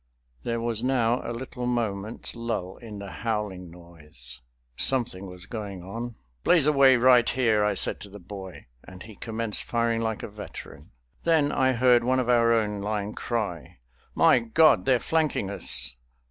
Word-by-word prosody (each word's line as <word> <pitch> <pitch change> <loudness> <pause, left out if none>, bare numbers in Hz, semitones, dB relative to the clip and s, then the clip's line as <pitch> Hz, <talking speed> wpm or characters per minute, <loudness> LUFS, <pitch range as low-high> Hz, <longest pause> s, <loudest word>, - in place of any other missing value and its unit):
There 115 0 -2
was 115 -1 -1
now 125 -2 +1
a - - -5
little 125 +1 -5
moment's 110 -3 -2
lull 115 -6 -4
in 110 -4 -9
the 100 -1 -8
howling 105 -2 -3
noise; 75 -8 -7 0.3
something 115 - 0
was 90 0 -10
going 100 -5 -6
on. 115 +5 -6 0.3
"Blaze 170 -5 +5
away 140 -3 +6
right 125 -1 +5
here," 110 -5 +2
I 105 -1 +1
said - - +2
to 100 - -9
the 100 - -11
boy, 95 0 -10 0.2
and 95 0 -12
he 110 - -11
commenced 110 0 -4
firing 115 -1 0
like 110 -1 -2
a - - -4
veteran. 100 -8 -10 0.3
Then 160 -4 +3
I 130 0 +2
heard 125 0 +4
one 130 +2 +2
of 125 -1 -1
our 115 -1 +4
own 105 -3 +1
line 105 0 -3
cry, 105 -9 -4 0.4
"My - - +5
God, 145 +6 +4
they're 130 -2 +4
flanking 155 -12 0
us!" 90 -9 +1
115 Hz, 165 wpm, -26 LUFS, 100-125 Hz, 0.4 s, away